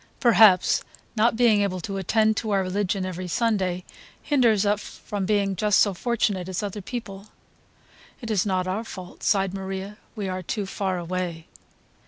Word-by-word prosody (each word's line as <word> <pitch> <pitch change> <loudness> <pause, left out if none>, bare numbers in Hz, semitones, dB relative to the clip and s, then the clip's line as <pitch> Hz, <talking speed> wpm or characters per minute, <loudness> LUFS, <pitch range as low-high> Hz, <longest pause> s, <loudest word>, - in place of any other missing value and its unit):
Perhaps 220 -6 +5 0.3
not 225 +1 +3
being 225 -3 +4
able 190 -2 -1
to 195 +3 -4
attend 215 +3 +2
to 220 - -2
our 195 -2 +2
religion 190 0 -1
every 185 0 -5
Sunday 185 -3 0 0.4
hinders 235 -8 +2
us 205 0 +1 0.2
from 200 -3 -3
being 200 -2 +1
just 210 +1 +2
so 200 - +4
fortunate 200 -3 -1
as 185 +2 -3
other 205 0 -4
people." 200 -2 -7 0.9
"It 230 -3 -5
is 200 -4 +2
not 185 -3 0
our 195 +5 -2
fault," 185 -5 -10
sighed 195 -2 +1
Maria, 195 +1 -5 0.2
"we 205 -3 -3
are 185 0 -3
too 200 +3 -3
far 190 -1 -2
away." 175 -1 -4
195 Hz, 165 wpm, -25 LUFS, 185-215 Hz, 0.9 s, Perhaps